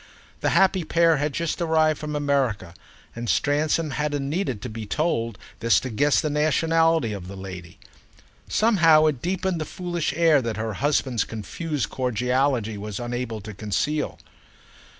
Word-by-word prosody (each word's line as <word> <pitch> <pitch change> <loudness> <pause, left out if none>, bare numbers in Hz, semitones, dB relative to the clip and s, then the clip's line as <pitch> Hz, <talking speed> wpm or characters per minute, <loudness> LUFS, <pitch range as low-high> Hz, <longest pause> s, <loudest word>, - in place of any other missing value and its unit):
The - - +1
happy 190 -1 +4
pair 165 0 +3
had 145 +1 -1
just 170 +3 -2
arrived 160 -2 +2
from 150 -1 -4
America, 135 -11 0 0.4
and 115 -1 -4
Stransom 150 - +1
hadn't 145 -1 -2
needed 150 - -2
to - - -3
be 110 -2 -7
told 115 -6 -1 0.2
this 115 0 +4
to 130 - -5
guess 145 +6 +3
the 155 - -1
nationality 160 -3 +2
of 95 -3 -7
the 100 - -8
lady. 90 -2 -9 0.7
Somehow 165 -9 +5
it 145 -6 0
deepened 185 -1 -1
the - - 0
foolish 175 -1 -3
air 160 -4 +4
that 115 -3 -3
her 110 0 -3
husband's 135 -5 +1
confused 140 +6 -4
cordiality 125 -2 0
was 105 -1 -5
unable 120 -2 -4
to 105 +2 -8
conceal. 110 +9 -2
140 Hz, 150 wpm, -24 LUFS, 115-160 Hz, 0.7 s, Somehow